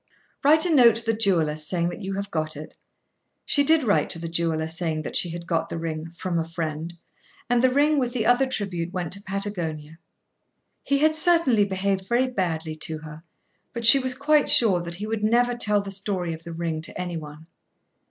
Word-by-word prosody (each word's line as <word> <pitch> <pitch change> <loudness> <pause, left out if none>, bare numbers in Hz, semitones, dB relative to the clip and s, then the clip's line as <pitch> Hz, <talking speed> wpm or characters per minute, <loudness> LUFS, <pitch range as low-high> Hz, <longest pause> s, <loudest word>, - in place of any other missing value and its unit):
"Write 310 +4 +5
a 345 - +1
note 240 -6 +6
to 230 0 -4
the 225 - +1
jewellers 165 -8 +1
saying 170 +2 -1
that 175 - -8
you 195 0 -4
have 200 0 -5
got 155 -2 -3
it." 155 +1 -10 0.7
She 285 - +2
did 315 +1 +3
write 205 -4 +1
to - - 0
the 165 0 -6
jeweller 165 -1 -1
saying 160 -1 -3
that - - -6
she 175 - +3
had 170 +1 -7
got 165 -1 -2
the - - -5
ring, 165 0 -5
"from 180 -3 -2
a - - 0
friend;" 165 0 -5 0.5
and 245 -1 +2
the 260 - +4
ring 290 +3 +2
with 250 -2 -1
the 235 -3 -2
other 245 +3 +3
tribute 185 -8 -3
went 180 -3 -4
to 200 - -2
Patagonia. 175 -6 -5 0.8
He 280 - 0
had 310 +2 +2
certainly 315 -10 +3
behaved 190 0 -2
very 240 +4 +2
badly 165 -9 -3
to 155 0 -2
her, 155 0 -11 0.5
but 235 -1 -4
she 275 +4 +9
was 260 -1 -1
quite 295 +2 +2
sure 195 -7 +6
that 170 0 -6
he 205 +4 -6
would 220 -1 -3
never 240 +3 +2
tell 210 -4 +2
the 200 - -6
story 190 -3 -2
of 160 0 -11
the 170 - -7
ring 165 -1 -3
to 170 - -6
any 180 -1 -4
one. 150 0 -10
190 Hz, 210 wpm, -24 LUFS, 165-240 Hz, 0.8 s, she